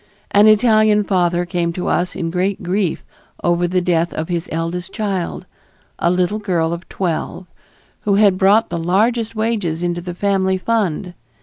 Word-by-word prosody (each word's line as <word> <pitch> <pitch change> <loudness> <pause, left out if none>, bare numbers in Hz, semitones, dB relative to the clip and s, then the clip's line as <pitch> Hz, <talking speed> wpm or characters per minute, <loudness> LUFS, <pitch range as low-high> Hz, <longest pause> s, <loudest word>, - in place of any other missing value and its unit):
An 205 +1 +6
Italian 215 -1 +4
father 175 -3 +1
came 175 -1 -1
to 180 - -4
us 180 +1 0
in 165 -1 -3
great 185 +3 -1
grief 180 0 -1 0.4
over 175 0 +2
the 180 +1 0
death 175 -1 +1
of 160 +2 -4
his 170 0 -3
eldest 170 +3 -3
child, 195 -5 -3 0.5
a 170 - +2
little 180 +4 0
girl 170 -5 0
of 170 +1 -8
twelve, 180 0 -3 0.5
who 200 -1 +1
had 200 -2 +4
brought 205 +4 +4
the 170 - -3
largest 220 +7 +1
wages 210 -7 -1
into 175 0 -1
the 175 0 -6
family 190 -1 +1
fund. 190 -4 -1
180 Hz, 165 wpm, -18 LUFS, 175-205 Hz, 0.5 s, An